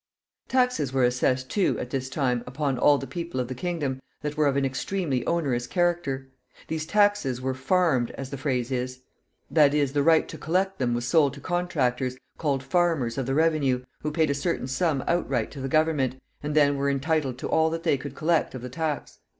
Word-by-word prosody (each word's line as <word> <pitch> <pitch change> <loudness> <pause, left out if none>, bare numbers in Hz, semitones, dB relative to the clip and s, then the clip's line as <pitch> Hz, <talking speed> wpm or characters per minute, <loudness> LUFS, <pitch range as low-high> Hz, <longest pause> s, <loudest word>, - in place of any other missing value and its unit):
Taxes 250 - +1
were 135 -1 +2
assessed, 125 +1 +1
too, 200 - +2
at 125 - -5
this 130 -1 -2
time, 125 -4 0
upon 135 +1 -1
all 145 - +5
the 135 - -5
people 170 +1 -5
of 125 - -1
the - - -2
kingdom, 140 -3 -3 0.2
that 150 0 -3
were 150 -1 +3
of 140 -1 +1
an 140 - +2
extremely 135 0 -1
onerous 135 -8 0
character. 170 -7 -1 0.4
These 160 -1 -3
taxes 205 -10 +2
were 130 +1 -1
farmed, 130 -2 +2
as 135 -1 -6
the 140 - -4
phrase 130 -3 -1
is; 130 0 -3 0.5
that 150 -2 +5
is, 140 -2 +1
the 145 - +2
right 160 +2 +4
to - - -8
collect 190 +4 0
them 120 -2 +1
was 120 0 -2
sold 140 -1 +3
to - - -10
contractors, 135 -7 -1 0.2
called 140 -4 0
farmers 145 -6 +1
of 130 - -2
the 135 - 0
revenue, 145 -5 +2
who 150 - -2
paid 155 -1 +2
a - - +2
certain 140 +1 -1
sum 135 +1 0
outright 135 -9 0
to 140 - -8
the 135 - -3
government, 145 -4 +1 0.2
and 150 +1 -3
then 145 -2 +4
were 140 0 +1
entitled 140 -2 0
to - - -4
all 160 0 +3
that 165 +1 -4
they - - +3
could 140 0 -7
collect 160 -1 +1
of 125 - -7
the 125 - -5
tax. 155 0 -3
140 Hz, 205 wpm, -26 LUFS, 130-160 Hz, 0.5 s, all